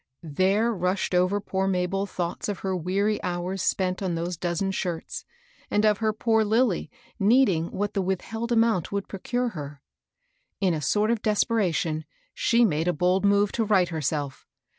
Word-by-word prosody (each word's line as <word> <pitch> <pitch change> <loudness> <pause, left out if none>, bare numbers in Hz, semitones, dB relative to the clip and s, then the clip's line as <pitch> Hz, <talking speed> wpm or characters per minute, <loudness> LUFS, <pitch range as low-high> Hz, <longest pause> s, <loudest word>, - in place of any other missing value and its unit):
There 190 +9 +1
rushed 180 0 -1
over 185 +3 +2
poor 195 -1 -2
Mabel 195 +1 0
thoughts 175 +1 -3
of 200 - -4
her 190 -1 -1
weary 195 +5 0
hours 180 +2 -3
spent 185 0 0
on 185 -3 -1
those 170 +2 -3
dozen 175 +3 -1
shirts, 175 -3 -4 0.4
and 210 +1 +2
of 210 -1 +3
her 220 -1 +1
poor 220 +1 +2
Lilly 220 -2 +1 0.3
needing 200 -6 +3
what 205 +1 -3
the 195 - 0
withheld 225 +5 -3
amount 225 -7 +2
would 200 -1 -2
procure 245 +5 -2
her. 145 -7 -8 0.8
In 190 -3 +2
a 155 - -2
sort 210 - +2
of 235 -2 0
desperation, 185 -8 0 0.3
she 235 0 +3
made 160 -3 0
a 180 - +2
bold 180 +5 +1
move 200 0 +3
to 230 - 0
right 195 -4 +3
herself. 150 -3 -3
190 Hz, 165 wpm, -26 LUFS, 175-215 Hz, 0.8 s, of